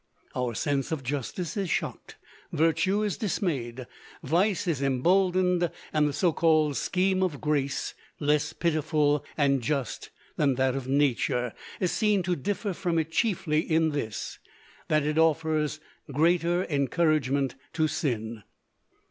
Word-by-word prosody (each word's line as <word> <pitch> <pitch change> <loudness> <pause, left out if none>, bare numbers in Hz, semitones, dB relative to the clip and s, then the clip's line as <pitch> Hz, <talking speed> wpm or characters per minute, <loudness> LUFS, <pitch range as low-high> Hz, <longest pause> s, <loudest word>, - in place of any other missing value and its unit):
Our 125 -2 -1
sense 140 +1 -1
of 155 -4 -2
justice 145 +6 -3
is 195 -4 -2
shocked, - - -3 0.4
virtue 185 +6 +2
is 205 -3 -1
dismayed, 135 - -2 0.4
vice 180 +7 +1
is 160 -6 -1
emboldened, 180 +6 +2 0.2
and 150 -1 +3
the - - -4
so 175 +2 +2
called 155 -3 +3
scheme 185 +1 +1
of 170 -7 0
grace, 145 -2 -1 0.3
less 150 0 +1
pitiful 150 -3 +1
and 140 -3 +3
just 135 0 -2 0.3
than 140 -3 +2
that 130 0 +2
of 135 -1 -4
nature, 130 -3 +1 0.3
is 180 - +1
seen 210 -4 +2
to 180 0 0
differ 205 +2 -2
from 175 -1 -1
it 160 0 -1
chiefly 165 -5 +1
in 160 -1 +2
this, 125 -8 -4 0.5
that 155 -1 +2
it 150 +1 +1
offers 155 -1 +1 0.3
greater 170 +4 +2
encouragement 140 -2 +1 0.2
to 155 -1 +2
sin. 115 -7 -2
155 Hz, 135 wpm, -27 LUFS, 140-175 Hz, 0.5 s, and